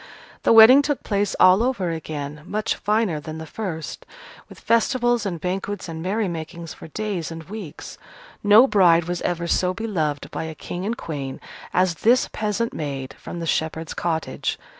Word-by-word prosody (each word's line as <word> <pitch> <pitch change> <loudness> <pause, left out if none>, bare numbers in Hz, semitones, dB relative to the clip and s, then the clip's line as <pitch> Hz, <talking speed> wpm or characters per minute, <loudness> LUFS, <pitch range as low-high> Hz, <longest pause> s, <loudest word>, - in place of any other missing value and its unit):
The - - +3
wedding 230 +5 +9
took 290 -1 -2
place 205 -1 0
all 185 +3 +7
over 235 -9 0
again, 150 -2 -5
much 215 +2 -1
finer 210 -6 0
than 155 +1 -7
the 160 - -7
first, 160 -3 -5 0.5
with - - -13
festivals 240 -1 +2
and 175 -4 -4
banquets 190 +3 -3
and 160 -1 -6
merrymakings 170 -4 -3
for - - -11
days 195 -1 -3
and 165 0 -7
weeks. 195 -4 -9 0.4
No 210 +4 +8
bride 180 -7 +5
was 175 +1 -3
ever 170 -1 -1
so 180 +2 +1
beloved 165 -10 -2
by - - -4
a 160 0 -6
King 180 +5 -5
and 230 +2 -2
Queen 140 -4 -5 0.3
as 180 -1 +2
this 245 +3 +4
peasant 215 +2 -1
maid 135 -3 -5
from 175 - -7
the 165 - -4
shepherd's 160 0 -2
cottage. 160 -2 -2
180 Hz, 165 wpm, -23 LUFS, 160-215 Hz, 0.5 s, wedding